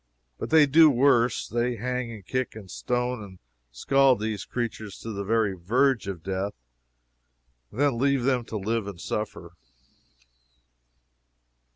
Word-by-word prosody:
But - - -4
they 155 -1 +6
do 155 +3 +6
worse. 125 -3 +3
They 120 +1 -1
hang 125 +1 -3
and 105 -5 -10
kick 130 0 -2
and 100 -5 -10
stone 125 0 -2
and 95 -2 -12 0.3
scald 135 - +3
these 105 -2 -3
wretched - - -43
creatures 110 -4 -4
to 115 - -6
the 100 -1 -4
very 110 -1 +1
verge 115 +6 +1
of 90 -5 -5
death, 95 +2 -3 1.1
and 120 - -10
then 140 -5 +2
leave 140 -1 +2
them 125 -2 +1
to 110 - -5
live 110 +1 -2
and 100 -4 -7
suffer. 90 -2 -5
115 Hz, 150 wpm, -26 LUFS, 100-130 Hz, 1.1 s, they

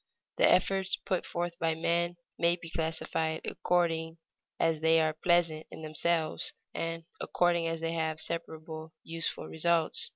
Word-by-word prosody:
The - - +6
efforts 190 +1 +3
put 185 - -2
forth 170 0 -3
by 165 -1 +1
men 170 +1 +1 0.2
may 170 0 +4
be 165 -2 -10
classified 160 0 -1
according 165 -2 0 0.4
as 165 -1 +2
they 160 +1 +5
are 155 -1 +2
pleasant 165 -1 +2
in 160 - -10
themselves, 155 +1 +1 0.2
and 165 0 -3 0.2
according 175 -1 +1
as 165 0 -2
they 165 0 -1
have 160 -1 -1
separable 160 -1 -4
useful 165 0 -3
results. 165 0 +2
165 Hz, 140 wpm, -30 LUFS, 160-170 Hz, 0.4 s, The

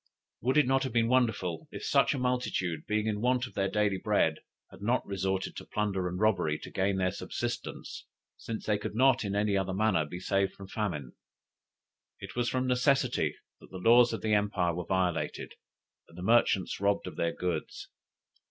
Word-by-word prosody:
Would 130 +4 +1
it 150 - +6
not 135 +1 +2
have 130 -3 -3
been 115 -1 +2
wonderful 110 -10 +1
if - - -7
such - - +3
a - - -3
multitude, 125 - -1
being 105 0 0
in 105 -1 -1
want 125 +1 +2
of 125 - -11
their 100 -1 0
daily 105 -1 +1
bread, 100 -7 +1 0.3
had 95 - -14
not 120 +5 +1
resorted 95 -1 -2
to - - -6
plunder 100 -3 -1
and 90 +1 -4
robbery 95 -8 +2
to - - -10
gain 95 0 0
their 90 -1 +1
subsistence, - - -5 0.3
since 115 -1 -6
they 105 -1 +1
could 105 - -5
not 130 +1 +4
in 100 -1 -2
any 105 0 +1
other 95 -1 -1
manner 100 -5 +2
be 90 +4 -7
saved 95 +1 0
from 95 -1 -11
famine? 85 - -3 1.1
It 100 0 -9
was 120 -1 0
from 130 0 0
necessity 125 0 +2 0.2
that - - -16
the 95 - -8
laws 120 +5 +6
of 115 - -4
the 110 -1 +1
empire 100 -4 +1
were 90 +1 -4
violated, 90 -3 -1 0.6
and 85 - -16
the 90 - -6
merchants 110 -3 +2
robbed 100 0 +1
of - - -7
their 85 0 0
goods. 90 -4 -3
100 Hz, 190 wpm, -30 LUFS, 95-120 Hz, 1.1 s, it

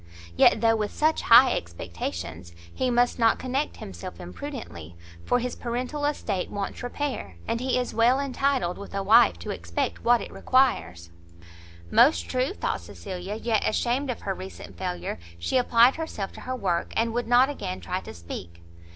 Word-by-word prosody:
Yet 210 - +5
though 225 -1 +4
with 210 -2 -1
such 310 +1 +1
high 245 +2 +7
expectations, 85 0 -6 0.2
he 255 - 0
must 245 0 +2
not 225 -1 +4
connect 265 +3 -2
himself 85 -1 -8
imprudently; 90 - -8 0.3
for - - +2
his 245 0 -3
paternal 250 +5 -3
estate 210 -10 -2
wants 200 -1 -4
repair, 245 - -4
and 230 - -1
he 255 +1 0
is 250 -1 -2
well 240 +4 +4
entitled 270 -9 0
with 200 0 -8
a 195 - -1
wife 210 - +6
to 85 - -6
expect 85 0 -3
what 240 0 +5
it - - -8
requires." 90 - +1 0.8
Most 85 - +5
true! 255 +2 0
thought 400 - -3
Cecilia, 190 +1 -7
yet 220 -1 0
ashamed 250 +5 0
of 250 - -3
her - - -2
recent 95 0 -9
failure, 85 0 -4 0.2
she 85 - 0
applied 245 +2 +5
herself 265 -12 -4
to - - -11
her 255 - -4
work, 180 -8 -1
and 230 0 +1
would 240 0 -2
not 250 +3 +5
again 185 -9 -5
try 185 +1 -3
to - - -9
speak. 85 0 -9
230 Hz, 170 wpm, -26 LUFS, -, 0.8 s, high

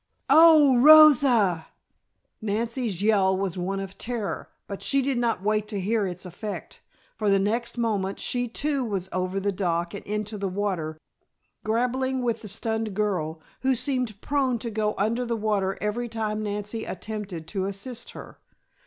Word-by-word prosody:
"Oh, 305 -4 +7
Rosa!" 255 - +7 0.7
Nancy's 220 -1 -2
yell 195 -3 +3
was 195 -2 -2
one 190 +2 -2
of 195 0 -7
terror, 230 -4 -4 0.2
but 200 - -7
she 275 - +1
did 265 -2 0
not 230 -5 0
wait 215 0 +1
to 210 -2 -4
hear 205 +1 0
its 180 +1 -7
effect, 200 +4 -7 0.3
for 210 -2 0
the 195 - +5
next 230 +5 -1
moment 205 -5 -1
she 245 -1 -1
too 280 +3 -1
was 195 -5 -3
over 185 +1 -1
the 200 +1 0
dock 175 -3 -1
and 200 - -7
into 210 0 -3
the 195 -1 -1
water, 180 -5 -2 0.7
grappling 250 +3 0
with 230 -2 -1
the 215 - -8
stunned 220 0 -2
girl, 175 -7 -1 0.2
who 265 0 +2
seemed 250 -5 -1
prone 270 -4 0
to 230 0 -5
go 210 0 -1
under 225 +5 0
the 235 -1 -2
water 205 -3 0
every 235 +3 -2
time 215 -1 -2
Nancy 210 +1 -4
attempted 195 -5 -6
to 190 -2 -2
assist 220 +5 -5
her. - - -11
215 Hz, 160 wpm, -25 LUFS, 195-240 Hz, 0.7 s, Oh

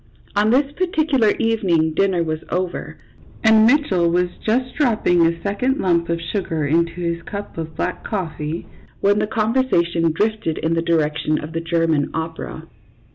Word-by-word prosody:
On 210 +1 +3
this 275 +4 +2
particular 310 - +1
evening 185 -9 +1
dinner 185 -1 +2
was 155 -1 -2
over, 180 0 -3 0.5
and 220 0 +6
Mitchell 215 - +3
was 180 +1 +1
just 250 +3 0
dropping 215 - +2
a 165 0 +1
second 250 +7 0
lump 170 -2 +1
of 170 0 0
sugar 165 -3 -2
into 165 +3 +1
his 170 -1 -3
cup 200 +4 -7
of 160 -1 -6
black - - -3
coffee, 165 -5 -4 0.3
when 205 +1 +3
the 215 - 0
conver 230 +5 0
sation 170 -3 +2
drifted 210 -2 -1
in 160 +1 0
the 165 - +1
direction 155 -2 0
of 155 +1 -7
the 165 - -2
German 165 -3 +1
opera. 160 0 -5
175 Hz, 160 wpm, -20 LUFS, 165-220 Hz, 0.5 s, and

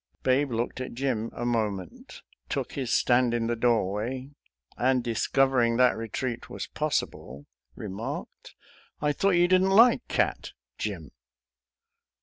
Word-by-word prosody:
Babe 135 +2 +2
looked 120 +1 -3
at 130 - -6
Jim 120 -4 -1
a 120 - -5
moment, 105 -6 -3 0.3
took - - -2
his 130 -4 -3
stand 120 -1 +3
in 115 -1 0
the 120 +1 0
doorway, 120 +3 0 0.4
and, 130 0 +1
discovering 120 0 +2
that 125 0 +4
retreat 115 +2 -4
was - - -5
possible, 70 +3 -3 0.3
remarked, 105 +1 -7 0.4
"I 150 0 +1
thought 195 +5 +2
you 175 0 +5
didn't 185 +1 +4
like 230 +5 +5
cat, - - -1 0.3
Jim.? - - -4
120 Hz, 130 wpm, -27 LUFS, 115-135 Hz, 0.4 s, you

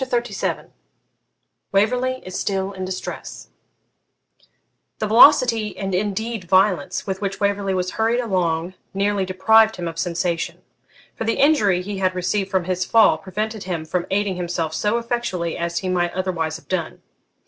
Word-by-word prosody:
CHAPTER 240 -3 -1
XXXVII - - -3 1.0
WAVERLEY 250 +6 +1
IS 185 0 -5
STILL 195 -1 -1
IN 185 -1 -5
DISTRESS 185 0 -6 1.5
The - - -2
velocity, 225 -1 +5
and 195 -1 -3
indeed 210 +2 -2
violence, 185 -3 +2
with 190 0 -4
which 195 -1 -3
Waverley 200 -1 0
was 185 0 -1
hurried 225 +2 +1
along 180 -6 -1 0.2
nearly 200 0 +1
deprived 220 +4 +4
him 175 -1 -4
of 165 0 -6
sensation; 170 -1 -2 0.5
for - - -5
the 230 - 0
injury 210 - +3
he 200 0 -5
had 185 -1 +1
received 190 +2 -1
from 190 -2 +1
his 185 +1 -1
fall 220 -8 +4
prevented 210 +4 -4
him 170 -4 -3
from 175 +2 -2
aiding 195 -1 0
himself 170 -3 -2
so 210 +6 0
effectually 230 -8 -2
as 170 0 -3
he 190 - -2
might 175 -1 0
otherwise 175 -4 -2
have - - -20
done. 180 -4 -3
190 Hz, 155 wpm, -21 LUFS, 180-215 Hz, 1.5 s, velocity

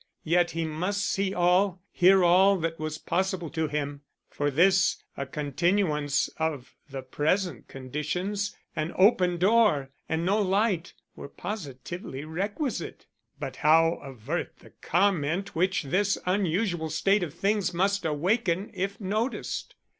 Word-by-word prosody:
Yet 175 +2 +2
he 165 - 0
must 180 +6 -2
see 195 -1 0
all, 180 +1 +2
hear 190 +1 +5
all 190 +3 +5
that 165 -1 -3
was 155 0 -3
possible 180 -1 -2
to 160 -1 -1
him. 145 -1 -3 0.3
For 145 0 -1
this 185 +6 +4 0.2
a 140 - -4
continuance 150 +1 0
of 155 -5 -3 0.2
the 135 -1 -6
present 155 - -1
conditions, 170 +10 -3 0.2
an 155 +2 -2
open 185 -3 +4
door 190 -8 +3 0.2
and 160 +1 -1
no 205 +4 +2
light, 195 -2 0 0.2
were - - -9
positively 150 - -6
requisite. 205 - -4 0.3
But - - -5
how 165 +2 +4
avert 135 +4 -5
the - - -18
comment 180 0 0
which 185 +2 +1
this 195 +8 +1
unusual 180 -2 0
state 195 +6 +2
of 165 -3 -4
things 200 0 +1
must 195 +3 +1
awaken 180 +5 0
if 195 +2 -3
noticed? 215 +5 -3
175 Hz, 130 wpm, -27 LUFS, 155-195 Hz, 0.3 s, hear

